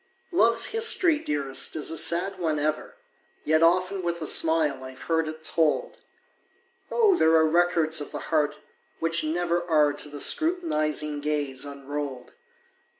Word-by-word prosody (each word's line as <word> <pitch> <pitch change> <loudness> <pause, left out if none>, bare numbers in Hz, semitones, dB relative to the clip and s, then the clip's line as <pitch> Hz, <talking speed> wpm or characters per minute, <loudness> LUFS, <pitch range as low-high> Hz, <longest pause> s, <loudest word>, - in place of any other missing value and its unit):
Love's 235 -10 +3
history, 385 -8 +2
dearest, 140 - -2
is 155 0 -3
a - - -4
sad 185 +4 +1
one 160 -3 -1
ever, 155 +1 -3 0.5
Yet 155 +1 +2
often 185 +3 +2
with 170 -1 -3
a 160 - -5
smile 155 -4 +1
I've 130 0 -10
heard 160 -1 0
it 155 0 -8
told! 160 -1 0 0.9
Oh, 435 -5 +3
there 160 - +3
are 160 0 +5
records 165 -1 +1
of 145 - -7
the - - -5 0.2
heart 150 -2 +1 0.4
which 165 0 -1
never 170 +2 -1
Are 150 -2 +3
to 145 +1 -5
the 145 0 -9
scrutinizing 155 - +1
gaze 145 -3 -2
unrolled! 140 -2 -6
160 Hz, 150 wpm, -25 LUFS, 150-175 Hz, 0.9 s, are